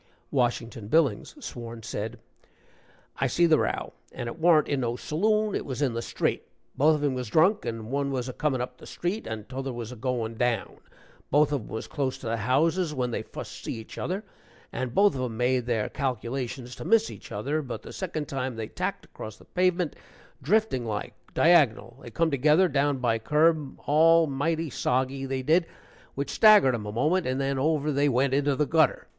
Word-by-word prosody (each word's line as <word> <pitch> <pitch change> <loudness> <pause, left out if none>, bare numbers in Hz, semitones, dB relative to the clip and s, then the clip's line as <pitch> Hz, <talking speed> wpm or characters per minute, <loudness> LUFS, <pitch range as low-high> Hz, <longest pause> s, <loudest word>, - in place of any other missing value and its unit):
Washington 120 -4 -1
Billings, 140 - +1
sworn, 115 -2 -7
said: 110 +3 -4 1.0
"I 135 - +1
see 170 +7 +3
the 160 -2 +4
row, - - -2 0.2
and - - -6
it 120 +8 -6
warn't 160 -2 +5
in 140 - 0
no 120 -2 -1
saloon 210 - 0
it - - -1
was 130 -2 -5
in 140 -5 +1
the 115 - -2
street. - - -1 0.3
Both 155 +3 +4
of 150 - -3
'em 145 -2 +1
was 125 -2 -4
drunk, 180 - +3
and 115 0 -5
one 140 0 0
was 130 -2 -2
a 130 - -5
comin' 140 -4 0
up 125 0 -6
the - - -12
street, 190 +6 -3
and 110 -1 -5
t'other 135 +1 -4
was 120 -1 -6
a - - -7
goin' 115 -2 -3
down. 120 -4 0 0.5
Both 150 +1 +4
of 145 -4 0
'em - - -12
was 110 - -5
close 135 -3 -2
to - - -12
the 115 0 -1
houses 150 - +1
when 125 -2 -1
they - - -2
fust - - -9
see - - -3
each 110 -1 -9
other, 190 +4 -2 0.5
and 130 -1 -3
both 205 0 +5
of 130 - -3
'em 120 -3 -3
made 125 0 +1
their 115 -3 0
calculations 125 -1 -3
to - - -7
miss 225 0 +3
each - - -12
other, 140 +10 -1
but 130 -5 -6
the - - -9
second 160 -6 -4
time 130 -2 -3
they 110 -1 -5
tacked - - -3
across 110 -1 -9
the - - -18
pavement 180 -2 0 0.5
driftin' 180 - +1
like, 105 -2 -4 0.2
diagonal 135 -7 +3
they - - -9
come 165 -1 0
together, 150 +7 +4
down 145 -3 +1
by 120 -3 +1
curb 150 +2 +2
al 165 +3 +5
mighty 155 +2 -1
soggy, 130 +2 -1
they 130 -1 -2
did 165 +5 +3 0.5
which 140 0 -3
staggered 210 - +6
'em 105 -3 -3
a - - -4
moment, 155 - +1
and 130 +1 -1
then, 135 0 0
over 150 +1 +1
they 145 +1 +2
went, 130 +1 +2
into 140 0 +2
the 150 - +1
gutter. 160 +1 +2
135 Hz, 205 wpm, -27 LUFS, 120-155 Hz, 1.0 s, staggered